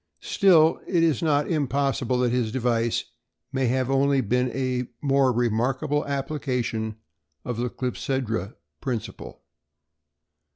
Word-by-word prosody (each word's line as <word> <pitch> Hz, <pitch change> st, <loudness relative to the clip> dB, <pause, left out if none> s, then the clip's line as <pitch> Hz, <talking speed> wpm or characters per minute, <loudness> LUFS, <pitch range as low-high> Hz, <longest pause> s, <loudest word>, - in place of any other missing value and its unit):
Still, 165 Hz, -5 st, +4 dB
it 170 Hz, -3 st, +2 dB
is 160 Hz, -6 st, +2 dB
not 150 Hz, -3 st, +2 dB
impossible 140 Hz, -4 st, 0 dB
that 125 Hz, -1 st, +2 dB
his 120 Hz, -3 st, 0 dB
device 120 Hz, -2 st, 0 dB, 0.5 s
may 130 Hz, -3 st, +1 dB
only 135 Hz, +2 st, +2 dB
have 120 Hz, -6 st, -1 dB
been 125 Hz, +1 st, +2 dB
a 125 Hz, -1 st, -2 dB
more 140 Hz, -3 st, +3 dB
remarkable 125 Hz, +6 st, 0 dB
application 130 Hz, -6 st, -2 dB, 0.5 s
of 120 Hz, -2 st, -3 dB
the 120 Hz, +1 st, -1 dB
clepsydra 125 Hz, -5 st, -3 dB, 0.3 s
principle. 120 Hz, -5 st, -5 dB
130 Hz, 115 wpm, -25 LUFS, 120-140 Hz, 0.5 s, Still